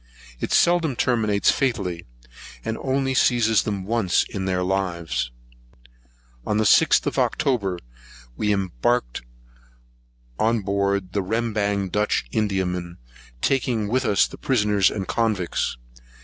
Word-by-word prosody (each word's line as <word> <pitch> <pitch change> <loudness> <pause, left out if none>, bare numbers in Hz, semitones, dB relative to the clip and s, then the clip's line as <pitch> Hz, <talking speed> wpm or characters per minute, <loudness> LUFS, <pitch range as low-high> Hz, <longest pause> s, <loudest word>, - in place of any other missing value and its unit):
It - - -3
seldom 170 -5 +3
terminates 110 -5 +2
fatally, 95 -10 -2 0.6
and 110 - -2
only 135 0 0
seizes 120 -4 +3
them 100 -3 -3
once 105 -3 +1
in 95 -2 -5
their 90 -1 0
lives.[165 - - -6
1] - - -1
On 105 - +2
the 110 - +2
6th 105 - +4
of - - -1
October, 100 -9 0 0.6
we 105 - 0
embarked 95 - -1 1.2
on 115 0 +2
board 100 -1 -1
the 100 - 0
Rembang 105 -1 -1
Dutch 105 -9 0
Indiaman, 90 -4 -2 0.5
taking 120 -5 +1
with 130 +5 0
us 105 -5 +3
the - - -10
prisoners 105 -6 +2
and 95 -3 -4
convicts. 105 - -1
100 Hz, 120 wpm, -23 LUFS, 90-115 Hz, 1.2 s, 6th